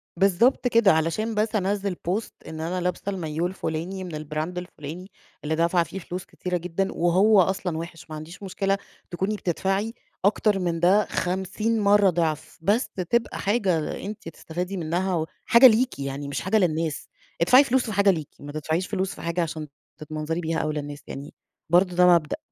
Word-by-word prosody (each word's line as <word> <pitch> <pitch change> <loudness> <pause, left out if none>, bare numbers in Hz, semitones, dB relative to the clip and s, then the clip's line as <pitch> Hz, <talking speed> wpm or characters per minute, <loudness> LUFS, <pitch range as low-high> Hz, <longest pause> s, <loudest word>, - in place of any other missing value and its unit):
بالضبط 200 +8 +3
كده، 230 -4 +5
علشان 165 +8 0
بس 215 +1 0
أنزّل 200 -1 0
post 205 +5 -1 0.2
إن 160 0 -6
أنا 175 +3 -2
لابسة 180 0 -1
المايوه 170 -3 -1
الفلاني 185 +1 -4
من 170 -4 -6
البراند 155 +3 -4
الفلاني، 175 +1 -7 0.3
اللي 155 +1 0
دافعة 170 +1 +2
فيه 170 +5 -7
فلوس 180 +1 -6
كتيرة 180 -1 -3
جدًا، 180 +3 -2
وهو 190 +4 +4
أصلًا 180 -2 -1
وحِش. 165 -1 -8
ما 155 - -6
عنديش 165 +6 -9
مشكلة 195 +1 0 0.3
تكوني 190 +4 -1
بتدفعي 195 +4 -1 0.3
أكتر 205 -1 +3
من 170 -2 -1
ده 190 +4 +4
50 190 +5 -1
مرة 205 -1 +5
ضعف، 160 -3 -2
بس 210 +9 +1 0.2
تبقى 235 0 0
حاجة 195 -7 0
أنتِ 205 -4 -7
بتستفادي 180 +4 -5
منها، 175 +3 -1 0.3
وحاجة 235 +3 +8
ليكِ 245 - +2
يعني، 140 +1 -4
مش 140 - -3
حاجة 190 +4 +2
للناس. 160 -5 0 0.3
ادفعي 255 +11 +7
فلوس 260 -1 +1
في 220 - -4
حاجة 200 0 +4
ليكِ، 155 -6 -4
ما 145 0 -8
تدفعيش 160 +4 -2
فلوس 190 -2 -2
في - - -10
حاجة 170 +1 -1
عشان 155 -2 -3 0.3
تتمنظري 155 +1 -4
بيها 160 0 -1
أو 155 -1 -1
للناس، 145 -1 -5
يعني 140 +2 -8 0.4
برضه 180 +1 +4
ده 180 0 +6
مبدأ. 170 -4 +3
180 Hz, 175 wpm, -25 LUFS, 160-200 Hz, 0.4 s, وحاجة